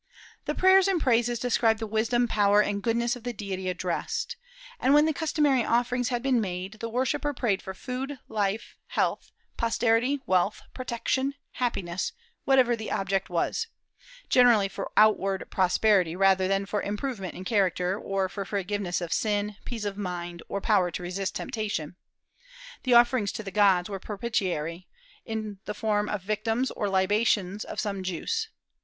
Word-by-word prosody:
"The - - -2
prayers 380 +1 +6
and 380 -3 +2
praises 240 -3 +2
describe 230 -2 +2
the 225 - -4
wisdom, 225 +3 +1
power, 205 -2 +3
and 205 -1 +1
goodness 235 +2 +1
of 245 - -10
the 245 0 -3
deity 190 -3 -4
addressed," 180 - -2 0.4
and 275 - +4
when 295 +1 +6
the 315 - +1
customary 295 -4 +2
offerings 245 +1 +1
had 245 -1 -2
been 260 -4 +2
made, 190 +1 -4
the 230 - -4
worshipper 265 +4 -1
prayed 210 -6 0
for 190 - -7
food, 260 +7 -5
life, 210 0 -2
health, - - -1 0.3
posterity, 230 +4 +2
wealth, 185 +2 +1
protection, 260 +2 -1 0.2
happiness, 190 -8 -2 0.3
whatever 260 -3 +4
the 220 -1 -6
object 195 0 -1
was, 180 - -1 0.6
generally 240 -5 +5
for 195 0 -6
outward 195 -3 +3
prosperity 185 -2 +3
rather 190 0 +4
than 195 +1 +1
for 205 +1 -2
improvement 210 -2 -4
in 185 - -8
character, 185 -3 +1
or 195 -2 -1
for 200 +1 -5
forgiveness 195 -2 -2
of 170 -2 -2
sin, 210 -1 0
peace 225 -4 -5
of 200 0 -4
mind, 175 -3 -4
or 200 - -2
power 195 -4 +2
to 175 - -6
resist 185 +2 -3
temptation. 205 -8 -3 0.9
The 250 -2 +3
offerings 240 -4 +4
to 220 - -5
the 195 - -6
gods 190 -3 +4
were 195 -2 -5
propitiatory, 185 -6 -3 0.4
in 215 -3 -4
the 210 - -4
form 210 -2 0
of 205 -3 -3
victims, 225 +5 -1
or 205 - -2
libations 200 0 +1
of - - -6
some 200 -3 -2
juice. 315 - -2
210 Hz, 160 wpm, -27 LUFS, 190-240 Hz, 0.9 s, prayers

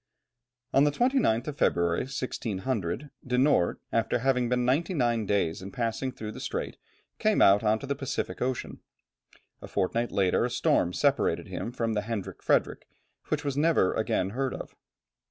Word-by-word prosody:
On 135 - +5
the 145 - +4
29th 235 - +1
of 145 - -7
February, 85 +2 +2
1600, 125 - -3
De 125 -1 -1
Noort, 130 -9 +3 0.2
after 115 +1 +1
having 125 -1 +1
been 125 0 +1
ninety 155 +9 +1
nine 120 -6 +1
days 95 -5 0
in 95 - -7
passing 125 +1 -2
through 110 -3 -7
the - - -9
strait, - - -4 0.4
came - - +2
out 100 +3 +6
on 110 0 +3
to 125 - -8
the 140 - -1
Pacific 135 -1 -4
Ocean. 130 0 -2 0.8
A - - -8
fortnight 115 +5 -1
later, 95 -2 +2
a - - 0
storm 85 - +2
separated - - +1
him 115 - -4
from 115 -2 -1
the 105 - 0
Hendrik 110 -2 -5
Fredrik, - - +1 0.4
which 150 -1 -2
was 140 -2 -1
never 150 - +3
again 95 -3 0
heard 130 +3 -2
of. - - -9
120 Hz, 170 wpm, -28 LUFS, 105-135 Hz, 0.8 s, out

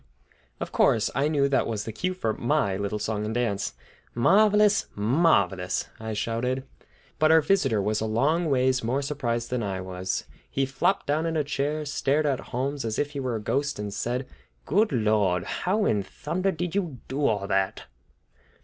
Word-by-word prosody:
Of - - -4
course, 110 - +3
I 140 +3 +1
knew 145 -3 +2
that 140 -1 +1
was 110 -2 -2
the 110 - -5
cue 185 - -2
for 115 -12 -1
my 120 -6 0
little 100 +2 -2
song 105 0 -2
and 110 +2 -3
dance. 105 - -1 0.4
"Marvelous! 210 - +4
marvelous!" 100 - +2
I 110 0 -4
shouted. 120 +5 -1 0.6
But 155 0 +5
our 160 - +7
visitor 145 - +2
was 105 +1 0
a 110 - -1
long 155 +10 +1
ways 130 -2 +2
more 130 +5 0
surprised 120 -5 -2
than 125 -1 0
I 95 -3 -2
was. 95 0 -3 0.3
He 135 - 0
flopped 135 +9 0
down 155 +3 0
in 165 -1 -1
a 150 - +2
chair, 145 +2 -2
stared 145 +1 +1
at 140 -3 +1
Holmes 135 +3 -2
as 110 -1 -2
if 145 0 -1
he 145 - -5
were 130 -3 -2
a - - -2
ghost, 140 +6 -1
and 105 -1 -4
said: 125 +5 -2 0.4
"Good 205 +7 +2
Lord! 105 -7 +2
How 190 - 0
in 105 -2 +2
thunder 185 - -2
did 175 0 -4
you 175 -9 -2
get 130 - -6
onto 145 0 +1
all 100 -3 0
that?" 95 -1 0
130 Hz, 185 wpm, -26 LUFS, 110-150 Hz, 0.6 s, our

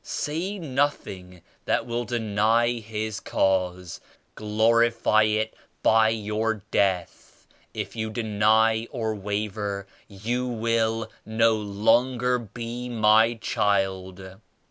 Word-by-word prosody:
Say 175 +7 -3
nothing 130 - -3 0.2
that - - 0
will 120 0 -3
deny 115 +1 +1
His 110 -1 -4
Cause! 90 -2 -1 0.3
Glorify 110 +1 +2
it 110 +1 0 0.3
by 110 0 +5
your 110 -1 -2
death! 95 -3 -1 0.3
If - - -5
you 110 -1 -3
deny 110 0 +2
or 110 -4 -2
waver 100 -1 -3 0.2
you 120 +5 -3
will 115 -1 -1
no 115 +1 +2
longer 120 +5 +1
be 120 +2 -6
my 110 0 +4
child!' 95 -2 -2
110 Hz, 100 wpm, -25 LUFS, 105-115 Hz, 0.3 s, by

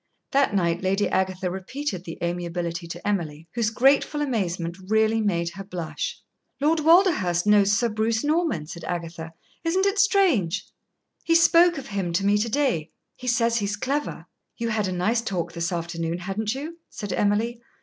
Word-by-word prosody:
That 270 -6 +2
night 170 -2 +1
Lady 195 +2 +1
Agatha 185 -1 -1
repeated 190 +2 -4
the 165 - -7
amiability 170 0 -3
to 170 - -7
Emily, 165 -6 -2
whose 230 -2 +1
grateful 275 +5 +3
amazement 185 - -1
really 220 +1 +3
made 170 -5 0
her 195 +3 -8
blush. 195 - -5 0.4
"Lord 310 +3 +2
Walderhurst 305 - +4
knows 205 -1 +5
Sir 235 +3 +2
Bruce 220 0 0
Norman," 305 - 0
said 170 +1 -9
Agatha. 165 -1 -5 0.3
"Isn't 370 +4 +1
it 400 +1 +1
strange? 320 - +3 0.6
He 330 - +2
spoke 335 0 +5
of 275 - -6
him 190 -4 -2
to 195 +3 +1
me 205 +1 +3
to 230 +2 0
day. 240 - 0 0.3
He 255 - -9
says 235 -1 +2
he 205 - 0
is 205 +1 -1
clever." 280 +6 -2 0.3
"You 230 -1 -2
had 215 -3 0
a - - -2
nice 205 +6 +1
talk 175 -6 -3
this 170 +1 -2
afternoon, 170 -1 -3
hadn't 205 +5 -3
you?" 315 +5 -7
said 205 - -5
Emily. 225 +4 0
205 Hz, 170 wpm, -25 LUFS, 175-265 Hz, 0.6 s, knows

